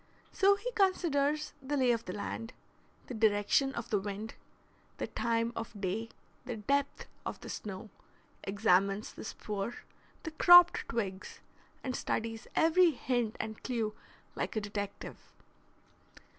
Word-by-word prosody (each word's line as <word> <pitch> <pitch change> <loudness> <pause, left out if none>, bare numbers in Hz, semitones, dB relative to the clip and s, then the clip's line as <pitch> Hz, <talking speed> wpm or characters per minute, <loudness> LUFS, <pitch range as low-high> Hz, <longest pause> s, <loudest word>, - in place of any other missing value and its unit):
So 400 -1 +5
he - - -4
considers 305 - +1
the 285 +2 -2
lay 255 -2 +4
of 230 -1 -1
the 180 - -5
land, 225 +3 -5 0.5
the - - -7
direction 220 +4 +3
of 235 - -5
the 205 - +3
wind, 205 +2 -5 0.6
the - - -2
time 230 0 -1
of 225 -2 -6
day, 205 +4 -2 0.3
the 250 -2 -4
depth 280 +6 0 0.2
of - - -5
the - - -8
snow, 205 +1 -6 0.5
examines 195 0 +2
the - - -9
spoor, 210 +1 -4 0.5
the 320 - -4
cropped 350 +2 +7
twigs, 195 -5 -4 0.4
and 255 -2 -2
studies 225 0 -3
every 340 +2 +5
hint 245 -5 -1
and 220 -1 -5
clew 225 -4 -1 0.4
like - - -3
a 215 - 0
detective. 205 -1 -5
230 Hz, 135 wpm, -32 LUFS, 205-280 Hz, 0.6 s, cropped